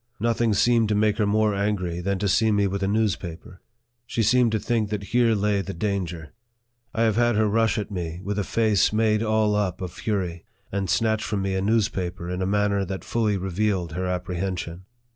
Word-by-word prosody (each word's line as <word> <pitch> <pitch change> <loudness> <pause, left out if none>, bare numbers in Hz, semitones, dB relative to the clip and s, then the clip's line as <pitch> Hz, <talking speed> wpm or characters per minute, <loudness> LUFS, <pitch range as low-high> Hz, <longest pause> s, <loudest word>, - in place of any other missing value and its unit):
Nothing 115 -1 +1
seemed 115 -2 +3
to 105 - +2
make 105 +1 +2
her 105 - +2
more 105 0 +2
angry 100 -4 -1
than 100 +2 -1
to 100 +2 -1
see 110 +3 +3
me 100 -1 +2
with 100 0 -2
a 95 - 0
news 105 -1 +2
paper. 90 +1 -10 0.5
She 115 - 0
seemed 120 +2 +4
to 110 - 0
think 110 -1 0
that 105 -1 -3
here 120 -2 +4
lay 105 -1 +1
the 95 -1 -6
danger. 90 -5 -3 0.6
I 115 - 0
have 110 -2 +2
had 120 -1 +3
her 110 0 +3
rush 115 +2 +2
at 105 0 -3
me 85 -3 -4
with 105 +1 -2
a - - 0
face 110 -2 +2
made 110 0 +2
all 110 -1 +2
up 100 -4 -1
of 90 -2 -5
fury, 90 -6 -3 0.3
and 95 -2 -2
snatch 110 +4 +1
from 100 -3 -2
me 95 0 -1
a 95 - 0
newspaper, 95 -5 -1
in 90 +1 -3
a 95 - 0
manner 100 0 +1
that 95 0 -5
fully 110 -3 0
revealed 95 -2 -1
her 90 +3 -3
apprehension. 90 -1 -3
100 Hz, 210 wpm, -24 LUFS, 95-110 Hz, 0.6 s, seemed